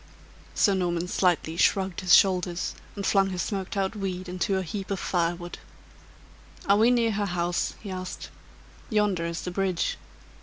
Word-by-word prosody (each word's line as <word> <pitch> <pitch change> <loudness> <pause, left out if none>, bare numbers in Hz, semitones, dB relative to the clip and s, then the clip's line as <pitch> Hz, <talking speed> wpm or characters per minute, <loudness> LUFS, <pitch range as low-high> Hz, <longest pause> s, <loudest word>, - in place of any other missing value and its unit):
Sir 200 - +4
Norman 175 -2 -1
slightly 175 -3 +1
shrugged 190 0 +2
his 185 -2 +7
shoulders, 180 -2 +2 0.2
and 200 -2 -4
flung 195 -1 +3
his 180 -1 -2
smoked 195 -1 -4
out 195 +2 0
weed 185 -2 -4
into 185 +2 -1
a 190 - -1
heap 190 +3 -5
of 195 -2 -2
fire 175 -1 0
wood. 175 0 -8 1.1
"Are 200 +1 +4
we 225 +3 +5
near 235 -2 +3
her 205 -1 -1
house?" 175 -1 -1
he 200 - -7
asked. 185 -1 -6 0.6
"Yonder 205 -6 +1
is 170 0 -4
the 180 - -4
bridge." 185 -1 -1
185 Hz, 165 wpm, -26 LUFS, 175-200 Hz, 1.1 s, his